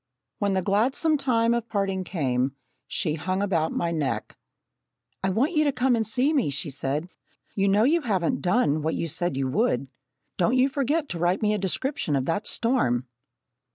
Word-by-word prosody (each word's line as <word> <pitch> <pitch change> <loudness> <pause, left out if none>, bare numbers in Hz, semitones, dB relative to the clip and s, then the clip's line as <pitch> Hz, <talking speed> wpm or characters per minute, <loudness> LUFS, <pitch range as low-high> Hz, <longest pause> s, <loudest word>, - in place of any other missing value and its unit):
When 200 -1 +1
the 190 -1 0
gladsome 245 - +2
time 235 -5 +2
of 235 -1 -2
parting 195 -3 -1
came, 135 -7 -1 0.3
she 160 -6 -1
hung 185 +5 -2
about 165 -5 0
my 170 - -1
neck. 155 -4 -2 0.9
"I 190 - +2
want 240 - +1
you 305 -3 +3
to 290 - +2
come 250 -1 +2
and 220 -2 0
see 265 +6 +2
me," 270 - +2
she 140 +2 -2
said. 140 +4 -2 0.5
"You 195 -1 +1
know 200 +2 +4
you 325 +7 +3
haven't 195 - 0
done 175 -6 +2
what 160 +2 -1
you 165 - -2
said 165 -2 -2
you 135 -1 0
would. 135 - 0 0.5
Don't 230 +8 +2
you 260 +2 +4
forget 285 +3 0
to 170 - -4
write 175 +4 +1
me 210 0 +3
a 210 - -1
description 190 - -1
of 130 -1 0
that 165 +8 -1
storm!" 180 - +1
195 Hz, 190 wpm, -25 LUFS, 160-245 Hz, 0.9 s, know